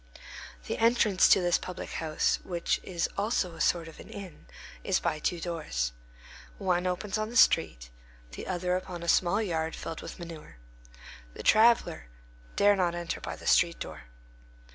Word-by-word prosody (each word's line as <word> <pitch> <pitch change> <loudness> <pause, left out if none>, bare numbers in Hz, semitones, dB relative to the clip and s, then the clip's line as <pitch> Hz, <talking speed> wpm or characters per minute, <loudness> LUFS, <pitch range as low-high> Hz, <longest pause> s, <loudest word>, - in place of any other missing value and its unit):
The - - -3
entrance 225 -4 +4
to 190 - +6
this 175 -1 +2
public 180 - -7
house, 155 -2 0
which 175 -2 -1
is 175 -2 -2
also 200 -4 0
a 165 - -8
sort 170 -2 +1
of 165 - -12
an - - -12
inn, 190 - -10 0.4
is - - +1
by 155 - -1
two 175 +3 -1
doors. 155 - -2 0.7
One 180 -1 0
opens 190 +3 -2
on 215 0 -2
the 240 - -2
street, - - +3 0.4
the - - -8
other 180 -1 -1
upon 180 -2 -5
a - - -6
small 175 +5 +3
yard 160 -4 -2
filled 165 - -6
with - - -8
manure. 165 - -10 0.8
The - - -8
traveller 220 - +4 0.5
dare 205 0 +5
not 175 -3 0
enter 170 -1 -4
by - - -5
the - - -13
street 170 0 +4
door. 75 -3 -8
175 Hz, 165 wpm, -29 LUFS, 165-190 Hz, 0.8 s, to